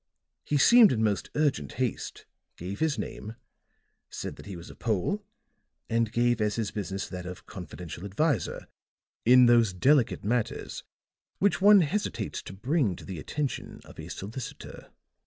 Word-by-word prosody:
He 150 Hz, -, 0 dB
seemed 230 Hz, +7 st, +7 dB
in 110 Hz, -3 st, +1 dB
most 105 Hz, -2 st, 0 dB
urgent 150 Hz, -3 st, 0 dB
haste, 125 Hz, -3 st, -3 dB, 0.3 s
gave 95 Hz, +4 st, -6 dB
his 160 Hz, -3 st, +1 dB
name, 110 Hz, +2 st, -6 dB, 0.7 s
said -, -, -6 dB
that -, -, -12 dB
he 100 Hz, -, -6 dB
was 85 Hz, 0 st, -10 dB
a -, -, -14 dB
Pole 115 Hz, -, -1 dB, 0.7 s
and 115 Hz, -1 st, +1 dB
gave 120 Hz, -1 st, +2 dB
as 105 Hz, 0 st, +1 dB
his 110 Hz, -3 st, -2 dB
business 95 Hz, -1 st, -4 dB
that 90 Hz, -1 st, -7 dB
of 90 Hz, 0 st, -8 dB
confidential 90 Hz, -2 st, -8 dB
adviser 105 Hz, -, -1 dB, 0.6 s
in 125 Hz, +1 st, +8 dB
those 120 Hz, -4 st, +5 dB
delicate 130 Hz, +6 st, +3 dB
matters 120 Hz, +2 st, -2 dB, 0.5 s
which 200 Hz, -2 st, +2 dB
one 205 Hz, 0 st, +8 dB
hesitates 200 Hz, +7 st, -2 dB
to -, -, -9 dB
bring 120 Hz, -, 0 dB
to -, -, -12 dB
the 95 Hz, -4 st, -6 dB
attention 145 Hz, -, -4 dB
of -, -, -14 dB
a -, -, -7 dB
solicitor. 110 Hz, +6 st, -8 dB
115 Hz, 155 wpm, -28 LUFS, 100-145 Hz, 0.7 s, in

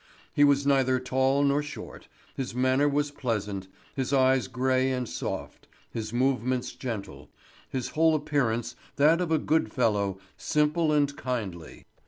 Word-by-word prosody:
He 145 Hz, -, +4 dB
was 140 Hz, -1 st, +4 dB
neither 130 Hz, -2 st, +3 dB
tall 130 Hz, +2 st, +1 dB
nor 140 Hz, +1 st, +2 dB
short, 145 Hz, -1 st, -9 dB, 0.3 s
his 130 Hz, -3 st, -4 dB
manner 130 Hz, +3 st, +3 dB
was 145 Hz, 0 st, 0 dB
pleasant, 105 Hz, -8 st, -3 dB, 0.3 s
his 135 Hz, -1 st, -2 dB
eyes 130 Hz, -4 st, +3 dB
gray 130 Hz, +2 st, +1 dB
and 125 Hz, -2 st, -2 dB
soft, 85 Hz, -, -5 dB, 0.2 s
his 110 Hz, -2 st, -4 dB
movements 125 Hz, 0 st, 0 dB
gentle, 100 Hz, -, -6 dB, 0.4 s
his 130 Hz, -2 st, -3 dB
whole 160 Hz, 0 st, +3 dB
appearance 120 Hz, -6 st, -1 dB, 0.2 s
that 155 Hz, +5 st, +4 dB
of 175 Hz, -2 st, -2 dB
a 160 Hz, -, +4 dB
good 150 Hz, -7 st, +1 dB
fellow, 100 Hz, -5 st, +1 dB, 0.2 s
simple 150 Hz, +1 st, +1 dB
and 145 Hz, -1 st, +2 dB
kindly. 100 Hz, -, -5 dB
130 Hz, 145 wpm, -27 LUFS, 120-145 Hz, 0.4 s, He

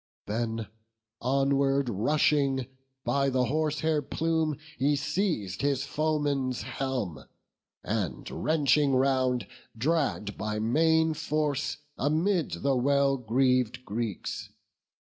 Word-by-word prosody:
Then 115 Hz, +1 st, -2 dB, 0.6 s
onward 135 Hz, +1 st, +2 dB
rushing, 135 Hz, +3 st, +2 dB, 0.4 s
by 140 Hz, -1 st, +1 dB
the 130 Hz, -1 st, +2 dB
horsehair 155 Hz, +2 st, 0 dB
plume 160 Hz, +1 st, 0 dB, 0.2 s
He 145 Hz, +3 st, +3 dB
seiz'd 145 Hz, -, -1 dB
his 140 Hz, -1 st, +1 dB
foeman's 145 Hz, -4 st, 0 dB
helm, 120 Hz, -, -3 dB, 0.6 s
and 100 Hz, -, -2 dB
wrenching 150 Hz, -2 st, +2 dB
round 130 Hz, -3 st, +2 dB, 0.3 s
Dragg'd 135 Hz, -6 st, 0 dB
by 105 Hz, +1 st, -2 dB
main 160 Hz, +8 st, +3 dB
force 150 Hz, -2 st, -1 dB, 0.2 s
amid 160 Hz, +5 st, 0 dB
the 140 Hz, -1 st, +3 dB
well 140 Hz, +2 st, +3 dB
greav'd 125 Hz, 0 st, +1 dB
Greeks. 110 Hz, -1 st, -4 dB
135 Hz, 95 wpm, -28 LUFS, 125-150 Hz, 0.6 s, He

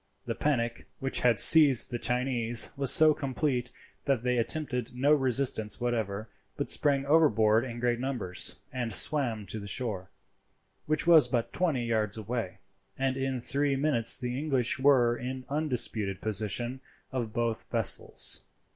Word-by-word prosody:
The 115 Hz, -, -3 dB
panic 120 Hz, -3 st, -2 dB
which 135 Hz, 0 st, -2 dB
had 120 Hz, -4 st, +2 dB
seized 145 Hz, -8 st, +8 dB
the 120 Hz, -, -4 dB
Chinese 125 Hz, -2 st, -1 dB
was 135 Hz, -2 st, +5 dB
so 155 Hz, -1 st, +7 dB
complete 135 Hz, -3 st, -3 dB, 0.3 s
that 135 Hz, -4 st, 0 dB
they 125 Hz, -1 st, 0 dB
attempted 125 Hz, -2 st, -3 dB
no 140 Hz, +4 st, +2 dB
resistance 130 Hz, -5 st, 0 dB
whatever, 110 Hz, -3 st, -3 dB, 0.3 s
but -, -, -1 dB
sprang 140 Hz, -2 st, +2 dB
overboard 120 Hz, -8 st, +3 dB
in 120 Hz, -2 st, -7 dB
great 120 Hz, 0 st, -1 dB
numbers 120 Hz, -9 st, -4 dB, 0.2 s
and 120 Hz, -3 st, -4 dB
swam 115 Hz, -2 st, +1 dB
to 110 Hz, +3 st, -6 dB
the 100 Hz, -, -9 dB
shore, 100 Hz, -5 st, -4 dB, 0.8 s
which 155 Hz, +2 st, -1 dB
was 165 Hz, -3 st, +6 dB
but 120 Hz, -3 st, -3 dB
twenty 155 Hz, -10 st, -1 dB
yards 110 Hz, -2 st, -1 dB
away, 110 Hz, -3 st, -5 dB, 0.4 s
and 135 Hz, 0 st, -1 dB
in 135 Hz, -1 st, -3 dB
three 140 Hz, +3 st, -1 dB
minutes 135 Hz, -5 st, +3 dB
the 125 Hz, 0 st, -4 dB
English 135 Hz, -6 st, -1 dB
were 130 Hz, -4 st, +3 dB
in 130 Hz, +1 st, -7 dB
undisputed 125 Hz, -9 st, -2 dB
possession 110 Hz, +4 st, -3 dB, 0.3 s
of 120 Hz, -4 st, -4 dB
both 115 Hz, 0 st, -3 dB
vessels. -, -, 0 dB
125 Hz, 145 wpm, -28 LUFS, 115-135 Hz, 0.8 s, seized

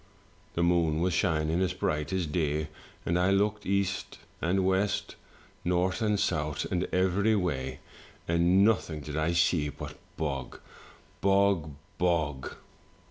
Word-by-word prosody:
The 85 Hz, -, +1 dB
moon 85 Hz, -3 st, +2 dB
was 90 Hz, +1 st, +1 dB
shining 80 Hz, -1 st, +1 dB
as 95 Hz, -, +1 dB
bright 75 Hz, -1 st, -1 dB
as 95 Hz, -2 st, 0 dB
day, 75 Hz, -1 st, -1 dB, 0.4 s
and 85 Hz, +1 st, +1 dB
I 90 Hz, +2 st, +3 dB
looked 105 Hz, +2 st, +1 dB
east 100 Hz, 0 st, -1 dB, 0.2 s
and 95 Hz, +3 st, +1 dB
west, 95 Hz, +2 st, 0 dB, 0.5 s
north 90 Hz, +4 st, +1 dB
and 105 Hz, -2 st, +2 dB
south, 75 Hz, -4 st, 0 dB
and 90 Hz, 0 st, +1 dB
every 95 Hz, +4 st, +2 dB
way, 65 Hz, -9 st, -2 dB, 0.5 s
and 85 Hz, +4 st, +4 dB
nothing 90 Hz, -8 st, +1 dB
did 75 Hz, +1 st, -6 dB
I 80 Hz, +2 st, +1 dB
see 85 Hz, -3 st, +2 dB
but -, -, -8 dB, 0.2 s
bog, 70 Hz, -5 st, -3 dB, 0.6 s
bog, 95 Hz, -6 st, +2 dB, 0.2 s
bog. 80 Hz, -6 st, 0 dB
85 Hz, 135 wpm, -29 LUFS, 75-95 Hz, 0.6 s, and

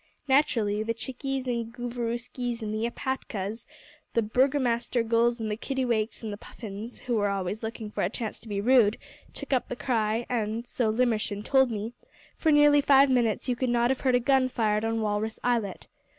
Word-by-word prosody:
Naturally 230 Hz, -7 st, +2 dB
the 230 Hz, +1 st, -2 dB
Chickies 265 Hz, +3 st, -4 dB
and 235 Hz, -2 st, -2 dB
the 240 Hz, -, -20 dB
Gooverooskies 240 Hz, 0 st, -3 dB
and 215 Hz, 0 st, -3 dB
the 220 Hz, +2 st, 0 dB
Epatkas 225 Hz, -5 st, -4 dB, 0.5 s
the 230 Hz, -, +3 dB
Burgomaster 245 Hz, 0 st, +1 dB
Gulls 235 Hz, +1 st, +2 dB
and 220 Hz, -1 st, -2 dB
the -, -, 0 dB
Kittiwakes 240 Hz, -3 st, -1 dB
and 215 Hz, -2 st, -4 dB
the -, -, -6 dB
Puffins, 215 Hz, +2 st, -8 dB
who 240 Hz, -3 st, 0 dB
are 205 Hz, 0 st, +1 dB
always 195 Hz, +1 st, -2 dB
looking 220 Hz, -1 st, -5 dB
for -, -, -3 dB
a 175 Hz, -, +1 dB
chance 225 Hz, 0 st, -5 dB
to -, -, -15 dB
be 205 Hz, -2 st, -2 dB
rude, 230 Hz, -1 st, +4 dB, 0.4 s
took -, -, -4 dB
up 255 Hz, -, +1 dB
the -, -, -3 dB
cry, 230 Hz, -2 st, 0 dB
and 230 Hz, -1 st, -2 dB
so 240 Hz, -2 st, 0 dB
Limmershin 220 Hz, -3 st, 0 dB
told 265 Hz, -2 st, +4 dB
me 220 Hz, +1 st, -4 dB, 0.4 s
for 320 Hz, -, +2 dB
nearly 295 Hz, -1 st, +6 dB
five 275 Hz, -1 st, +5 dB
minutes 235 Hz, -3 st, +1 dB
you 250 Hz, -, +1 dB
could 255 Hz, +1 st, -1 dB
not 240 Hz, +1 st, +3 dB
have 265 Hz, -, -1 dB
heard 255 Hz, -2 st, +3 dB
a -, -, +4 dB
gun 260 Hz, +1 st, +3 dB
fired 215 Hz, -3 st, 0 dB
on 225 Hz, 0 st, 0 dB
Walrus 215 Hz, +1 st, -1 dB
Islet. 230 Hz, -6 st, -1 dB
235 Hz, 195 wpm, -27 LUFS, 215-250 Hz, 0.5 s, nearly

